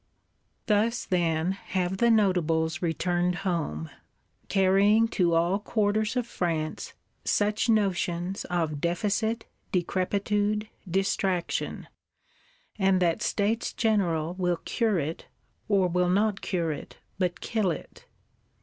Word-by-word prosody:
Thus, 225 +1 +1
then, 170 -1 +1
have 190 -1 -2
the 235 +4 +3
Notables 165 -7 +2
returned 175 +1 0
home; 80 - -2 0.6
carrying 200 +3 +4
to 175 -6 +2
all 170 +4 +2
quarters 215 +1 0
of 250 -2 0
France, 165 -7 -3 0.3
such 210 +3 +1
notions 190 -3 0
of 160 -5 -1
deficit, 210 +6 0 0.3
decrepitude, 205 +4 0 0.2
distraction; 190 -1 -1 0.9
and 190 -1 +3
that 170 -2 +1
States 220 +3 0
General 175 -8 +1
will 180 -1 +1
cure 225 -5 +1
it, 160 +1 -4 0.4
or 195 -3 +3
will 180 0 +1
not 200 +2 +1
cure 170 -4 -1
it 145 - -8 0.2
but 180 -2 0
kill 215 -4 0
it. 165 - -7
185 Hz, 110 wpm, -27 LUFS, 170-210 Hz, 0.9 s, carrying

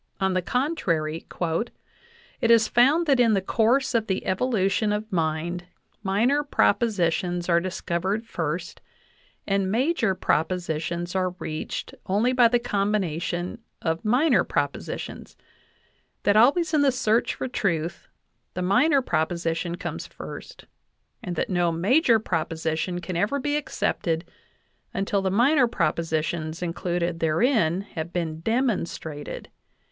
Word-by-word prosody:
On 190 -1 +1
the 185 - +1
contrary: 175 - -1 1.1
"It 230 - +1
is 230 -1 +6
found 275 +8 +4
that 275 -4 +3
in 230 -3 +5
the - - +3
course 240 +8 +2
of 225 -2 +1
the 190 -1 -2
evolution 210 0 +1
of 210 +1 -3
mind 170 +1 -1 0.4
minor 225 +9 +2
propositions 180 - +1
are 170 -1 +4
discovered 185 +4 -2
first, 170 -4 -4 0.6
and 195 -1 0
major 235 - +1
propositions 170 0 -1
are 185 -1 0
reached 155 -2 -5
only 215 +7 +2
by 245 -2 +6
the 245 +1 +3
combination 195 -4 -1 0.2
of 160 0 -1
minor 250 +9 +3
propositions; - - -4 0.9
that 205 - +3
always 300 +9 +4
in 300 - +4
the 280 -2 +4
search 235 -3 +1
for - - -3
truth 170 -8 -2 0.5
the 180 - -2
minor 265 - +3
proposition 170 -1 -1
comes 175 - -5
first, - - -10 0.6
and 180 -2 -4
that - - -1
no 175 -2 +2
major 225 - +4
proposition 165 -2 -2
can 180 0 -5
ever 205 +11 +1
be 290 +2 -1
accepted 170 - -1 0.7
until 195 0 0
the 190 - 0
minor 250 +6 +4
propositions 160 -3 -1
included 175 0 -2
therein 170 - +2
have 170 -4 -6
been 165 -3 -3
demonstrated. 175 - -2
190 Hz, 125 wpm, -25 LUFS, 170-235 Hz, 1.1 s, is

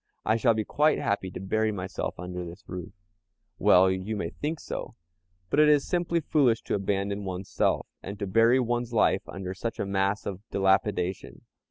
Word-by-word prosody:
I 110 - +3
shall 115 0 +3
be 110 - 0
quite 150 +1 +2
happy 100 -2 -1
to 90 - -7
bury 110 +3 0
myself 95 -2 -4
under 90 0 -5
this 85 0 -10
roof." 90 0 -6 0.7
"Well, 95 +1 +6
you 95 +4 -3
may 85 -5 -3
think 155 +2 -4
so, - - -6 0.6
but - - +2
it 150 0 +7
is 145 -2 +4
simply 170 -1 0
foolish 130 -7 +2
to - - -3
abandon 100 0 -1
one's 95 0 -5
self, - - +1 0.2
and 100 +2 -7
to 100 - -3
bury 115 +6 +4
one's 120 -1 -1
life 115 - +3
under 95 -1 -5
such 115 +5 -4
a - - -2
mass 100 +1 0
of 95 -2 -5
dilapidation. 95 -1 0
100 Hz, 185 wpm, -27 LUFS, 95-115 Hz, 0.7 s, it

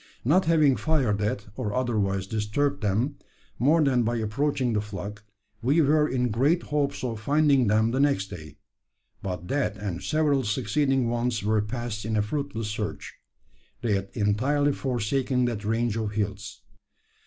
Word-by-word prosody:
Not 175 +9 +4
having 155 -5 +4
fired 130 -11 +1
at, 105 0 -1
or 105 -1 -3
otherwise 105 -7 0
disturbed 110 +8 -1
them, 110 +7 0 0.4
more 155 +7 +4
than 130 -4 +3
by 120 +1 0
approaching 125 +3 0
the 105 - +1
flock, 105 0 -7 0.4
we 140 +8 +3
were 150 0 +4
in 125 -1 0
great 145 +10 +2
hopes 140 -2 -1
of 115 -3 -3
finding 140 0 +3
them 110 +2 +3
the 130 - 0
next 140 -9 +2
day; 80 -5 -9 0.6
but 90 -2 -5
that 135 -7 0
and 95 -3 -4
several 150 -3 +1
succeeding 130 +4 +1
ones 120 -2 -1
were 110 +1 +2
passed 110 0 -4
in 110 +1 -1
a 105 - +2
fruitless 115 -2 -3
search. 105 -1 -4 0.7
They 115 -3 +1
had 95 0 -1
entirely 130 +7 +1
forsaken 125 +1 0
that 115 -4 -2
range 115 +1 0
of 110 -2 -2
hills. 105 0 -4
115 Hz, 155 wpm, -26 LUFS, 105-140 Hz, 0.7 s, Not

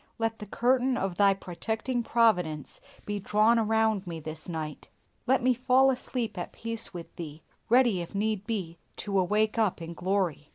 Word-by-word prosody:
Let 225 -1 -1
the 210 - -7
curtain 250 +4 +2
of 190 -4 -2
Thy 200 -1 +5
protecting 220 +7 -3
providence 180 -11 +1 0.2
be 205 0 -2
drawn 215 +4 +3
around 220 -3 +1
me 165 -2 -5
this 155 +1 -7
night. 155 -3 -5 0.4
Let 260 -1 +3
me 255 0 +4
fall 255 +2 +4
asleep 245 -5 -3
at 175 - -5
peace 230 0 -4
with 175 -2 -9
Thee, 155 -2 -7 0.3
ready, 240 -6 +4
if 170 +4 -8
need 210 0 -1
be, 180 -7 -3 0.2
to 200 -2 0
awake 210 +4 +1
up 215 -6 +1
in 165 0 -6
glory. 180 -4 -1
210 Hz, 170 wpm, -28 LUFS, 175-230 Hz, 0.4 s, Thy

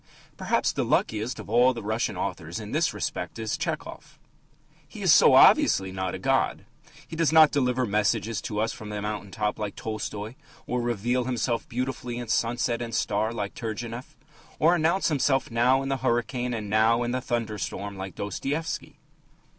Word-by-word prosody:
Perhaps - - +1
the - - -1
luckiest 110 +3 0
of - - -8
all 120 +4 +4
the 115 - -6
Russian 110 +3 -1
authors - - -4
in - - -8
this - - +1
respect 90 +3 -4
is 110 -1 -2
Tchehov. - - -5 0.7
He - - -9
is - - +6
so - - +7
obviously 95 -1 +6
not 95 -1 -3
a - - -4
god. - - 0 0.4
He - - -8
does 165 -1 +2
not 160 -2 +7
deliver 130 -2 +1
messages 105 +1 0
to 105 - -4
us 110 +1 0
from 110 -3 -9
the 105 0 -4
mountain 105 -1 -4
top 105 +2 -2
like 105 -2 -4
Tolstoy, 110 0 -5 0.3
or 125 0 -1
reveal 120 +2 0
himself 120 -1 -1
beautifully 125 -1 -3
in 120 -2 -6
sunset 120 +1 0
and 115 -2 -4
star 105 +2 0
like 105 -4 -4
Turgenev, 115 +2 -6 0.4
or 165 +3 +4
announce 170 +3 +2
himself 135 -3 +1
now 125 +3 +3
in 135 - -4
the 135 - 0
hurricane 120 +1 -1
and 105 -2 -5
now 110 +3 +3
in 120 - -2
the 130 +1 -1
thunderstorm 105 -4 -3
like 95 0 -7
Dostoevsky. 140 - -4
115 Hz, 175 wpm, -26 LUFS, 105-125 Hz, 0.7 s, so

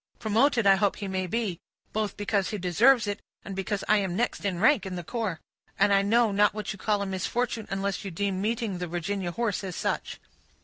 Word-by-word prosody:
Promoted 230 +2 +2
I 195 -1 +6
hope 200 0 +2
he 200 - -5
may 190 -1 -2
be, 205 -4 -2 0.3
both 215 -1 -2
because 205 -1 0
he 210 - -3
deserves 220 +7 +4
it, 205 0 -3 0.2
and 195 - -6
because 195 +1 -2
I 215 - +5
am 190 -3 -1
next 240 +5 -1
in 195 -3 -1
rank 225 +1 +4
in 190 -1 -5
the 175 - -5
corps; 210 -4 -3 0.4
and 200 - +4
I 195 - +5
know 225 +2 +3
not 205 0 +3
what 215 0 -3
you 195 - -12
call 205 0 +1
a - - -3
misfortune, 220 +4 -2
unless 195 +1 -2
you 200 - -4
deem 190 +1 -2
meeting 220 -3 -1
the 180 - -3
Virginia 175 +2 -3
horse 215 0 -1
as 185 -3 -5
such." - - -2
200 Hz, 220 wpm, -27 LUFS, 190-220 Hz, 0.4 s, I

